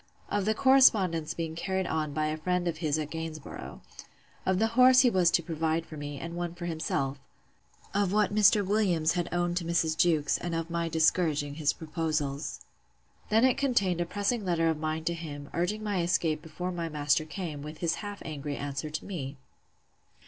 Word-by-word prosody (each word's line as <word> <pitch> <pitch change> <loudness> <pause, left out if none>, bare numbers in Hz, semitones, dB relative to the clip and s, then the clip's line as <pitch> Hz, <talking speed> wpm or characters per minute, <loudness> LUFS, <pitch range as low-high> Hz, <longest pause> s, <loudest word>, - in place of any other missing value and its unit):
Of 205 -2 0
the 215 +1 +1
correspondence 210 - +4
being 165 -1 -3
carried 190 +3 -2
on 155 -3 -1
by 155 +1 -1
a 155 0 -1
friend 180 +2 -1
of 165 -2 -1
his 155 -2 0
at 150 -1 -4
Gainsborough. 155 - -7 0.7
Of 190 -1 +3
the 225 +3 +2
horse 255 +1 +7
he 250 -3 +4
was 180 -4 +4
to 170 0 +2
provide 160 0 -1
for 155 - -10
me, 145 -1 -6
and 170 0 -6
one 175 -1 -3
for 175 0 -6
himself. 145 -4 -2 0.7
Of 200 -2 +1
what 210 0 +2
Mr. 205 -1 +5
Williams 185 -6 +2
had 175 -1 -2
owned 175 0 0
to 180 - -1
Mrs. 165 -1 +1
Jewkes; 160 -3 +2
and 175 -1 -3
of 165 0 -3
my 170 -1 -1
discouraging 160 -3 +2
his 145 -1 +1
proposals. 155 -3 -3 0.7
Then 225 +3 +4
it 260 - +2
contained 200 -11 +1
a 170 - -1
pressing 205 +4 -1
letter 170 -3 +1
of 160 -2 -1
mine 155 0 -2
to 170 - 0
him, 145 -4 -7
urging 205 +5 -1
my 205 -4 0
escape 165 -3 +1
before 180 +3 -5
my 170 -2 -3
master 150 0 +1
came; 155 -2 -6
with 150 +2 -8
his 170 0 0
half 205 -1 -7
angry 145 -2 -4
answer 145 +2 -4
to 155 - -5
me. 145 -8 -5
165 Hz, 190 wpm, -29 LUFS, 155-185 Hz, 0.7 s, horse